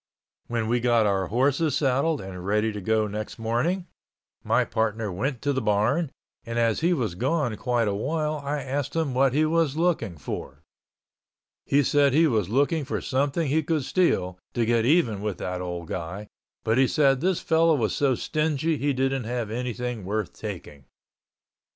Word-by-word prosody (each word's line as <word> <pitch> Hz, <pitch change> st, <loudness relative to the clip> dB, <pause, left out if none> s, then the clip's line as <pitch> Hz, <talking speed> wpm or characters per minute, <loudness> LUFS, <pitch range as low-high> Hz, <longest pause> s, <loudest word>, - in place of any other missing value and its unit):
When 115 Hz, -2 st, -1 dB
we 120 Hz, +2 st, +2 dB
got 120 Hz, -2 st, +3 dB
our 95 Hz, -2 st, +1 dB
horses 140 Hz, -, +1 dB
saddled 140 Hz, +3 st, +1 dB
and 95 Hz, -2 st, -8 dB
ready 105 Hz, +3 st, +1 dB
to 105 Hz, -1 st, -6 dB
go 110 Hz, +2 st, +1 dB
next 105 Hz, +1 st, -5 dB
morning, 120 Hz, +12 st, -1 dB, 0.6 s
my -, -, +2 dB
partner 110 Hz, -1 st, -1 dB
went 120 Hz, +7 st, -3 dB
to 145 Hz, -, +1 dB
the 130 Hz, -, -1 dB
barn 115 Hz, +9 st, +1 dB, 0.3 s
and 115 Hz, 0 st, -5 dB
as 115 Hz, -2 st, +2 dB
he 170 Hz, +3 st, +2 dB
was 120 Hz, -, 0 dB
gone 130 Hz, -, 0 dB
quite 120 Hz, -1 st, 0 dB
a 100 Hz, -, 0 dB
while 150 Hz, +7 st, -2 dB
I 145 Hz, 0 st, -2 dB
asked 135 Hz, +2 st, -3 dB
him 160 Hz, -5 st, 0 dB
what 130 Hz, +1 st, +3 dB
he 155 Hz, +1 st, +4 dB
was 160 Hz, -2 st, +1 dB
looking 160 Hz, -, 0 dB
for. 70 Hz, -, -7 dB, 1.0 s
He 145 Hz, +1 st, +4 dB
said 140 Hz, 0 st, +3 dB
he 165 Hz, +2 st, +5 dB
was 110 Hz, -, +1 dB
looking 145 Hz, +6 st, +1 dB
for 135 Hz, -, -3 dB
something 140 Hz, +3 st, 0 dB
he 155 Hz, +3 st, +2 dB
could 155 Hz, -1 st, -1 dB
steal, 90 Hz, -, +1 dB, 0.2 s
to 120 Hz, -2 st, +2 dB
get 115 Hz, 0 st, +2 dB
even 125 Hz, -, +3 dB
with 105 Hz, -2 st, -3 dB
that 90 Hz, 0 st, -4 dB
old 90 Hz, -2 st, -5 dB
guy, 90 Hz, +4 st, -5 dB, 0.4 s
but 110 Hz, +3 st, +2 dB
he 135 Hz, -, +5 dB
said 135 Hz, -3 st, +3 dB
this 185 Hz, 0 st, +1 dB
fellow 165 Hz, 0 st, +3 dB
was 115 Hz, -6 st, 0 dB
so 135 Hz, -3 st, +2 dB
stingy 155 Hz, +3 st, 0 dB
he 145 Hz, 0 st, 0 dB
didn't 135 Hz, -1 st, 0 dB
have 120 Hz, -2 st, -3 dB
anything 125 Hz, -1 st, -3 dB
worth 105 Hz, 0 st, -2 dB
taking. 70 Hz, -3 st, -8 dB
125 Hz, 180 wpm, -25 LUFS, 110-145 Hz, 1.0 s, he